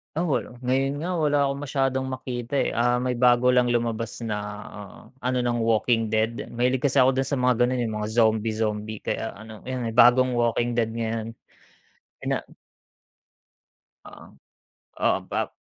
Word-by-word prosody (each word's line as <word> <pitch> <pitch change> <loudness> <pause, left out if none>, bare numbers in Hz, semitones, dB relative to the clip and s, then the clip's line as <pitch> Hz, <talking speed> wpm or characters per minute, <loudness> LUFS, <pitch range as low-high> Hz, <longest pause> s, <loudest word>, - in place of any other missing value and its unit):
Ah, 165 - 0
wala. 145 -6 -2
Ngayon 135 +3 0
nga 175 - -3
wala 150 -2 +2
akong 140 0 -3
masyadong 135 -1 0
makita, 125 -1 -5
eh. - - 0
Ah, 120 +1 +2
may 125 0 0
bago 125 0 +4
lang 125 -1 +3
lumabas 115 -1 -2
na 110 -2 -2 0.8
ano 125 0 -1
ng 120 -1 0
Walking 115 0 +2
Dead. 110 +2 -1
Mahilig 125 +2 +1
kasi 140 0 +1
ako 130 +1 +5
dun 135 0 0
sa 140 - 0
mga 125 0 +3
gano'n, 125 0 -1
yung 110 -2 -3
mga 105 0 -3
zombie, 110 -1 +2
zombie 110 -1 -2
kaya 115 - -3
ano, 110 0 -11
may 125 -3 -3
bagong 125 +1 +6
Walking 120 0 +1
Dead 115 -1 +1
ngayon. 115 0 -3 0.9
Ina - - 0 1.7
Oo. - - -13 0.8
Oo. - - +3
Ba - - -2
120 Hz, 160 wpm, -25 LUFS, 115-130 Hz, 1.7 s, bagong